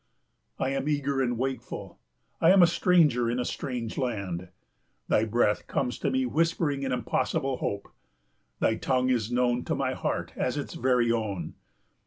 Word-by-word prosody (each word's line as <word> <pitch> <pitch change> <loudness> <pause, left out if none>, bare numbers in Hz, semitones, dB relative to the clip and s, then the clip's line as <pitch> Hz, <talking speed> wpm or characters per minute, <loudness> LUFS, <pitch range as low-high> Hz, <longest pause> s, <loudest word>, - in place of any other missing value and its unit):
I 130 - 0
am 135 +2 -1
eager 140 -2 0
and 120 -2 0
wakeful, 130 +2 -4 0.4
I 165 - +6
am 190 -1 +7
a - - +9
stranger 160 -9 +3
in 120 - -1
a 125 - -1
strange 120 -3 -4
land. 100 -8 -3 0.6
Thy 110 - +3
breath 110 -1 +1
comes 125 -2 -1
to - - 0
me 260 0 +1
whispering 165 - 0
an 135 - -1
impossible 130 +1 -1
hope. 100 - -3 0.7
Thy 110 - +2
tongue 130 -1 +1
is 120 -2 0
known 125 0 +1
to - - -1
my - - -1
heart - - -3
as 125 +3 -1
its 145 - -4
very 125 -2 +2
own. 100 -8 -2
125 Hz, 165 wpm, -28 LUFS, 115-140 Hz, 0.7 s, a